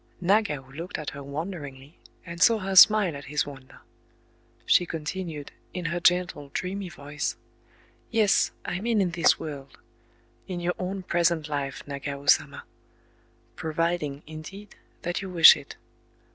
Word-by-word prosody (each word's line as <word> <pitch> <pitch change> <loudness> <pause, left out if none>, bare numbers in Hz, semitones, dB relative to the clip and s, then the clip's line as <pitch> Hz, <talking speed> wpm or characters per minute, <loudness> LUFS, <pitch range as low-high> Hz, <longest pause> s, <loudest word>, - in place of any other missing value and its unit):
Nagao 175 -9 +1
looked 170 +7 -6
at 150 - -5
her 145 - -9
wonderingly, 145 -1 -7 0.3
and 170 0 -8
saw 230 +2 +6
her 195 -2 -3
smile 200 -4 +7
at 140 - -8
his 150 +1 -1
wonder. 135 -2 -12 0.8
She 175 - +4
continued, 160 -1 -5 0.2
in 180 -2 -4
her 170 +1 -1
gentle, 175 -5 +1
dreamy 190 +1 -3
voice,— 150 -2 -4 0.7
"Yes, 220 -4 +3 0.2
I 175 - -3
mean 225 +1 0
in 185 -3 +1
this 170 -2 +3
world,—in 150 +4 -10
your 175 +1 -1
own 185 +1 -4
present 170 -3 +1
life, 140 -2 -4
Nagao 140 0 -6
Sama... - - +2 0.9
Providing, 160 -2 -2
indeed, 160 +7 -10 0.3
that 175 +2 -2
you 190 - -6
wish 170 -3 +9
it. 145 -2 -10
170 Hz, 135 wpm, -26 LUFS, 145-185 Hz, 0.9 s, wish